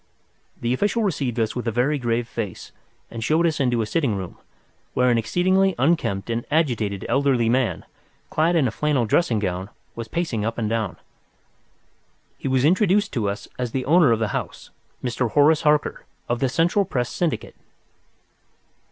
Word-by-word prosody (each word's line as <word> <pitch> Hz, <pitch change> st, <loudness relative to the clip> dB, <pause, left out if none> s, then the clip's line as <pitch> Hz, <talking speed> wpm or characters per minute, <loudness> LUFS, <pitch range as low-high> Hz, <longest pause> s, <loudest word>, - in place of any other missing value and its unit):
The 120 Hz, +1 st, 0 dB
official 205 Hz, -, 0 dB
received 135 Hz, -, -1 dB
us 110 Hz, -1 st, 0 dB
with 125 Hz, -1 st, -4 dB
a -, -, +1 dB
very 130 Hz, +6 st, +1 dB
grave 120 Hz, -1 st, -1 dB
face 105 Hz, -7 st, -6 dB, 0.4 s
and 115 Hz, -1 st, -5 dB
showed 160 Hz, +7 st, +2 dB
us 160 Hz, -3 st, 0 dB
into 120 Hz, -4 st, +1 dB
a -, -, -3 dB
sitting 125 Hz, -1 st, 0 dB
room, 95 Hz, -2 st, -6 dB, 0.6 s
where 125 Hz, 0 st, +3 dB
an 115 Hz, -, +3 dB
exceedingly 185 Hz, -, +2 dB
unkempt 130 Hz, -9 st, +1 dB
and 115 Hz, +1 st, -1 dB
agitated 115 Hz, -, 0 dB
elderly 130 Hz, -2 st, +2 dB
man, 125 Hz, 0 st, 0 dB, 0.5 s
clad 165 Hz, +3 st, +2 dB
in 150 Hz, -6 st, +3 dB
a -, -, -2 dB
flannel 145 Hz, -1 st, 0 dB
dressing 115 Hz, +1 st, +2 dB
gown, 95 Hz, -1 st, -2 dB, 0.2 s
was 115 Hz, -1 st, -6 dB
pacing 145 Hz, -8 st, -2 dB
up 115 Hz, +1 st, -2 dB
and 110 Hz, -2 st, -1 dB
down. 110 Hz, -5 st, -2 dB, 1.4 s
He -, -, -4 dB
was 130 Hz, 0 st, +2 dB
introduced 195 Hz, +4 st, +3 dB
to 110 Hz, -6 st, 0 dB
us 100 Hz, +1 st, -5 dB
as 125 Hz, -2 st, -3 dB
the 130 Hz, -1 st, -2 dB
owner 155 Hz, -3 st, +5 dB
of 115 Hz, -, +3 dB
the 110 Hz, -1 st, -1 dB
house—Mr. 125 Hz, +2 st, -5 dB
Horace 150 Hz, +1 st, +5 dB
Harker, 150 Hz, -1 st, +1 dB, 0.2 s
of 120 Hz, 0 st, -1 dB
the 135 Hz, -, +1 dB
Central 170 Hz, +8 st, +2 dB
Press 125 Hz, -9 st, -2 dB
Syndicate. 170 Hz, -4 st, -2 dB
125 Hz, 170 wpm, -23 LUFS, 115-155 Hz, 1.4 s, owner